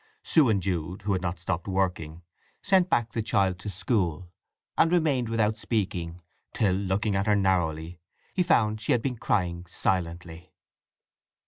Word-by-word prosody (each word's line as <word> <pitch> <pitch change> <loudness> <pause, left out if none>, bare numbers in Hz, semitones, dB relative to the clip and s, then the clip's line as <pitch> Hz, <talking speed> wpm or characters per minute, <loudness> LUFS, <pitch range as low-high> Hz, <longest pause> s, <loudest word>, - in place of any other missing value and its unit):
Sue 150 -7 +6
and 100 -4 +1
Jude, 90 +1 -3
who 100 0 0
had 95 - -1
not 90 -1 -3
stopped 90 +1 -3
working, 90 -4 -2 0.4
sent 190 -3 +3
back 115 -8 +1
the 115 - -2
child 95 -4 +1
to 105 - -6
school, 90 -4 -1 0.4
and 165 - +3
remained 145 -9 +1
without 110 -1 +1
speaking; 90 -6 -3 0.3
till, 100 -4 +2
looking 100 +2 -1
at 100 +2 0
her 105 - +4
narrowly, 85 -4 0 0.3
he 185 - +1
found 110 -11 +2
she 110 - +1
had 120 - 0
been 130 -2 -1
crying 90 -5 -1
silently. 85 -3 -3
95 Hz, 155 wpm, -27 LUFS, 90-110 Hz, 0.4 s, Sue